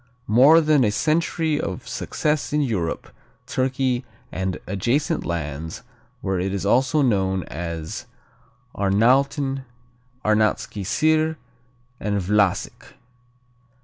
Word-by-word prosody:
More 135 Hz, +9 st, +6 dB
than 150 Hz, -3 st, +4 dB
a 110 Hz, -, +3 dB
century 160 Hz, +4 st, 0 dB
of 95 Hz, -2 st, -5 dB
success 150 Hz, -1 st, -1 dB
in 150 Hz, 0 st, +2 dB
Europe, 100 Hz, -, -2 dB, 0.4 s
Turkey 130 Hz, -1 st, 0 dB, 0.3 s
and 95 Hz, -1 st, -2 dB
adjacent 120 Hz, +10 st, 0 dB
lands 80 Hz, -1 st, -4 dB, 0.4 s
where 95 Hz, -2 st, -1 dB
it 95 Hz, +2 st, -1 dB
is 100 Hz, -, -3 dB
also 130 Hz, +7 st, +3 dB
known 95 Hz, -6 st, +1 dB
as 85 Hz, 0 st, -6 dB, 0.7 s
Arnauten, 135 Hz, +7 st, +2 dB, 0.6 s
Arnautski 110 Hz, -1 st, +1 dB
Sir 155 Hz, -, +2 dB, 0.6 s
and 100 Hz, -1 st, -1 dB
Vlasic. 100 Hz, 0 st, 0 dB
110 Hz, 100 wpm, -23 LUFS, 95-140 Hz, 0.7 s, More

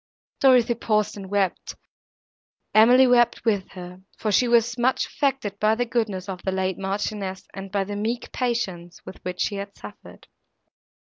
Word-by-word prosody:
Dorothée 245 Hz, -3 st, +4 dB
paused 215 Hz, -1 st, +1 dB
and 195 Hz, -2 st, -9 dB
wept, 200 Hz, -2 st, -1 dB, 1.0 s
and 220 Hz, +2 st, +7 dB
Emily 255 Hz, +1 st, +7 dB
wept 245 Hz, -2 st, +3 dB
with 205 Hz, -4 st, +1 dB
her; 180 Hz, 0 st, -10 dB, 0.2 s
for 215 Hz, -, -2 dB
she 245 Hz, +5 st, +3 dB
was 235 Hz, 0 st, +3 dB
much 250 Hz, +1 st, +1 dB
affected 265 Hz, -8 st, -2 dB
by 215 Hz, +1 st, +3 dB
the 245 Hz, +2 st, -1 dB
goodness 220 Hz, -6 st, -2 dB
of 185 Hz, -2 st, -6 dB
the 190 Hz, -, -2 dB
late 190 Hz, -1 st, -2 dB
Marchioness, 195 Hz, 0 st, -4 dB
and 195 Hz, 0 st, -8 dB
by 200 Hz, -1 st, 0 dB
the 205 Hz, +1 st, -6 dB
meek 225 Hz, +4 st, -3 dB
patience 190 Hz, -9 st, -3 dB
with -, -, -11 dB
which 180 Hz, 0 st, -5 dB
she 205 Hz, -, -1 dB
had 200 Hz, 0 st, -7 dB
suffered. -, -, -12 dB
205 Hz, 165 wpm, -24 LUFS, 190-235 Hz, 1.0 s, and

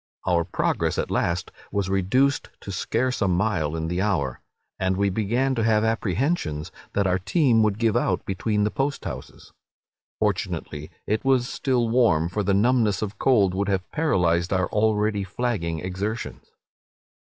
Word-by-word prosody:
Our 85 Hz, -2 st, +2 dB
progress -, -, 0 dB
at -, -, -2 dB
last 85 Hz, +2 st, -1 dB, 0.2 s
was 100 Hz, -2 st, -1 dB
reduced 105 Hz, +9 st, +1 dB
to 100 Hz, -, -7 dB
scarce 120 Hz, +7 st, -1 dB
a 100 Hz, -, +3 dB
mile 90 Hz, -4 st, 0 dB
in 80 Hz, 0 st, -2 dB
the 90 Hz, +2 st, -1 dB
hour, 95 Hz, -11 st, -1 dB, 0.4 s
and 95 Hz, 0 st, 0 dB
we 100 Hz, 0 st, +2 dB
began 120 Hz, +7 st, 0 dB
to 115 Hz, -3 st, 0 dB
have 110 Hz, -1 st, +3 dB
apprehensions 110 Hz, -, -1 dB, 0.2 s
that 100 Hz, -, +1 dB
our 90 Hz, 0 st, +2 dB
team 120 Hz, -, +3 dB
would 105 Hz, -2 st, +2 dB
give 115 Hz, -2 st, +1 dB
out -, -, 0 dB
between 105 Hz, +2 st, 0 dB
the 105 Hz, -, +1 dB
post 140 Hz, +6 st, -2 dB
houses. -, -, -8 dB, 0.6 s
Fortunately 75 Hz, +1 st, -2 dB, 0.2 s
it 110 Hz, +1 st, -1 dB
was 130 Hz, -2 st, +2 dB
still 125 Hz, -4 st, 0 dB
warm, 115 Hz, -9 st, +3 dB
for 105 Hz, +4 st, -2 dB
the 100 Hz, -1 st, +1 dB
numbness 110 Hz, -2 st, +2 dB
of 105 Hz, -1 st, -5 dB
cold 105 Hz, -8 st, +3 dB
would 100 Hz, +2 st, -1 dB
have 95 Hz, -2 st, -2 dB
paralyzed 90 Hz, -, +1 dB
our 95 Hz, -2 st, +1 dB
already 105 Hz, -1 st, +1 dB
flagging 95 Hz, -6 st, -2 dB
exertions. 100 Hz, +5 st, -4 dB
100 Hz, 160 wpm, -24 LUFS, 90-115 Hz, 0.6 s, a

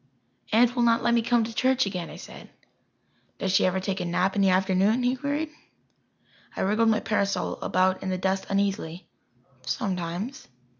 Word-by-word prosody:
"Aunt 240 Hz, +3 st, +4 dB
will 245 Hz, -, +1 dB
not 230 Hz, -1 st, +3 dB
let 235 Hz, -, +3 dB
me 235 Hz, -, +3 dB
come 235 Hz, 0 st, +2 dB
to 225 Hz, +1 st, -5 dB
church 260 Hz, +1 st, +2 dB
again," 180 Hz, -4 st, -4 dB
I -, -, -9 dB
said. -, -, -11 dB, 0.9 s
"Does 190 Hz, -, -1 dB
she 190 Hz, -, +4 dB
ever 185 Hz, +1 st, 0 dB
take 190 Hz, 0 st, -3 dB
a -, -, -2 dB
nap 180 Hz, +2 st, 0 dB
in 200 Hz, -, +2 dB
the 195 Hz, -, +4 dB
afternoon?" 190 Hz, +5 st, +2 dB
he 250 Hz, +1 st, +2 dB
queried. 295 Hz, +3 st, -2 dB, 1.0 s
I -, -, -3 dB
wriggled 215 Hz, +4 st, +2 dB
my 220 Hz, -, +2 dB
parasol 200 Hz, -2 st, -1 dB
about 185 Hz, 0 st, +1 dB
in 190 Hz, -, -3 dB
the 185 Hz, -, -1 dB
dust 190 Hz, +1 st, -1 dB
uneasily. 195 Hz, -3 st, -2 dB, 0.6 s
"Sometimes." 185 Hz, +6 st, -3 dB
200 Hz, 180 wpm, -26 LUFS, 185-235 Hz, 1.0 s, Aunt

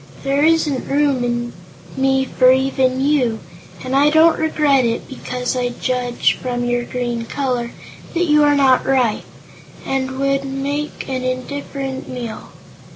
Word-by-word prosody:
There 275 Hz, +1 st, +1 dB
isn't 310 Hz, -4 st, +2 dB
room 280 Hz, -3 st, +1 dB
in 240 Hz, 0 st, -2 dB, 0.4 s
me 265 Hz, 0 st, +2 dB
for 255 Hz, 0 st, +4 dB
even 260 Hz, -1 st, +1 dB
you, 265 Hz, -5 st, +1 dB, 0.5 s
and 255 Hz, +1 st, -2 dB
I 285 Hz, +2 st, +5 dB
don't 320 Hz, +2 st, +4 dB
regret 300 Hz, -4 st, +2 dB
it 230 Hz, -1 st, -2 dB
because 250 Hz, -1 st, -4 dB
I 250 Hz, -1 st, 0 dB
judge, 250 Hz, -1 st, 0 dB
from 245 Hz, -1 st, -2 dB
your 245 Hz, 0 st, 0 dB
green 240 Hz, -2 st, -3 dB
color, 250 Hz, -4 st, -2 dB, 0.5 s
that 350 Hz, +1 st, +2 dB
you 300 Hz, -2 st, +4 dB
are 290 Hz, 0 st, +4 dB
not 265 Hz, -3 st, +4 dB
ripe, 255 Hz, -5 st, +1 dB, 0.6 s
and 265 Hz, -1 st, -2 dB
would 275 Hz, 0 st, +1 dB
make 275 Hz, +2 st, -4 dB
an 260 Hz, -1 st, -3 dB
indifferent 265 Hz, +1 st, -4 dB
meal. 240 Hz, -3 st, -6 dB
265 Hz, 145 wpm, -19 LUFS, 250-280 Hz, 0.6 s, I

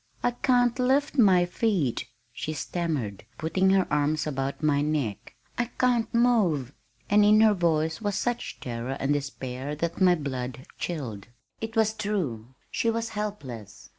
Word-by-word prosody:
"I 245 Hz, -, +3 dB
can't 245 Hz, 0 st, +2 dB
lift 275 Hz, +3 st, +2 dB
my 185 Hz, -5 st, +6 dB
feet," 175 Hz, -, 0 dB, 0.3 s
she 155 Hz, -, -4 dB
stammered, 150 Hz, -, -3 dB
putting 185 Hz, +4 st, +1 dB
her 190 Hz, -1 st, +4 dB
arms 150 Hz, +1 st, +1 dB
about 135 Hz, 0 st, -3 dB
my 145 Hz, -2 st, +3 dB
neck. 145 Hz, -9 st, -2 dB, 0.2 s
"I 240 Hz, -, +2 dB
can't 240 Hz, -3 st, +2 dB
move!" 200 Hz, -, +2 dB, 0.3 s
and 205 Hz, +1 st, +5 dB
in 210 Hz, +1 st, +6 dB
her 220 Hz, -1 st, +6 dB
voice 160 Hz, -2 st, 0 dB
was 205 Hz, -2 st, -1 dB
such 240 Hz, +2 st, -2 dB
terror 120 Hz, +2 st, -4 dB
and 135 Hz, +2 st, +1 dB
despair 140 Hz, -1 st, -4 dB
that 170 Hz, +4 st, -3 dB
my 180 Hz, -1 st, +6 dB
blood 130 Hz, -4 st, -5 dB
chilled. 125 Hz, -, -4 dB, 0.3 s
It 225 Hz, +1 st, -5 dB
was 220 Hz, -1 st, +3 dB
true! 155 Hz, -, -3 dB, 0.2 s
She 230 Hz, -, +1 dB
was 230 Hz, 0 st, -1 dB
helpless. 135 Hz, -, -6 dB
165 Hz, 150 wpm, -27 LUFS, 135-215 Hz, 0.3 s, my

